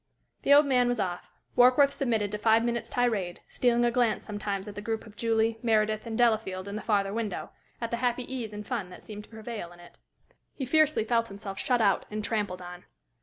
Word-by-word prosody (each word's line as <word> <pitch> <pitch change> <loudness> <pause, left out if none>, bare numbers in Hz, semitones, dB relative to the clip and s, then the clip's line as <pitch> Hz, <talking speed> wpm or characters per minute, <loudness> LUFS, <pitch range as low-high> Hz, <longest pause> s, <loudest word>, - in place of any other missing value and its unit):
The - - +1
old 295 +1 +7
man 250 -3 +3
was 245 -1 0
off. 180 -3 -3 0.3
Warkworth 255 +3 +6
submitted 225 -8 0
to 210 - -3
five 225 +1 +4
minutes' 235 -1 -2
tirade, 220 -8 0
stealing 240 -1 +2
a 240 - +2
glance 235 -3 +1
sometimes 205 -1 -4
at 210 - -6
the 205 - -7
group 225 +1 -3
of 215 -2 -14
Julie, 225 0 +1
Meredith, 215 -1 +1
and 225 -1 -3
Delafield 215 -5 +1
in 200 - -5
the 215 - -4
farther 200 -2 +1
window 220 -4 -3 0.3
at 230 -1 -4
the 235 - 0
happy 245 0 0
ease 245 -4 -5
and 210 0 -7
fun 225 -8 -3
that 180 - -12
seemed 210 -1 -8
to - - -26
prevail 220 -5 -7
in 175 - -15
it. 175 - -16 0.6
He 270 - -3
fiercely 310 -1 +3
felt 230 +1 +1
himself 195 -1 -7
shut 245 +2 +1
out 200 -2 +2
and 215 0 -4
trampled 205 -4 -2
on. 180 0 -10
220 Hz, 220 wpm, -28 LUFS, 205-240 Hz, 0.6 s, old